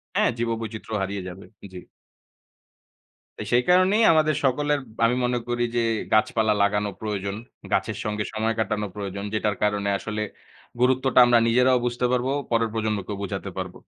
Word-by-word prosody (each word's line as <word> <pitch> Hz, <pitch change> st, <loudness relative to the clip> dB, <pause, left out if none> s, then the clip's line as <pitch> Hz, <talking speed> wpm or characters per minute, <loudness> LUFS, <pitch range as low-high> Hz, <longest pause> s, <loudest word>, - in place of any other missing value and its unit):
হ্যাঁ, -, -, +3 dB
জীববৈচিত্র্য 115 Hz, -1 st, -4 dB
হারিয়ে 95 Hz, -1 st, -3 dB
যাবে। 95 Hz, +2 st, -9 dB, 0.3 s
জি। 90 Hz, -, -7 dB, 1.6 s
তো -, -, -5 dB
সেই 125 Hz, -, +4 dB
কারণেই 185 Hz, +5 st, +4 dB
আমাদের 155 Hz, -1 st, +3 dB
সকলের 145 Hz, +2 st, +1 dB, 0.3 s
আমি 120 Hz, +2 st, +2 dB
মনে 125 Hz, 0 st, 0 dB
করি 120 Hz, 0 st, -1 dB
যে 120 Hz, -, +2 dB, 0.3 s
গাছপালা 110 Hz, 0 st, +3 dB
লাগানো 105 Hz, 0 st, +1 dB
প্রয়োজন। 100 Hz, -2 st, -3 dB, 0.4 s
গাছের 100 Hz, +2 st, 0 dB
সঙ্গে 105 Hz, 0 st, -2 dB
সময় 110 Hz, +1 st, -1 dB
কাটানো 105 Hz, -1 st, -1 dB
প্রয়োজন। 100 Hz, -1 st, -5 dB
যেটার 105 Hz, -1 st, 0 dB
কারণে 105 Hz, -1 st, +1 dB
আসলে 105 Hz, +1 st, -4 dB, 0.6 s
গুরুত্বটা 130 Hz, 0 st, +3 dB
আমরা 120 Hz, -1 st, +5 dB
নিজেরাও 125 Hz, +1 st, +3 dB
বুঝতে 120 Hz, 0 st, -1 dB
পারবো, 125 Hz, +1 st, 0 dB, 0.2 s
পরের 115 Hz, -1 st, +2 dB
প্রজন্মকেও 105 Hz, -2 st, -2 dB
বোঝাতে 100 Hz, -, -4 dB
পারব। -, -, -4 dB
110 Hz, 145 wpm, -24 LUFS, 105-125 Hz, 1.6 s, আমরা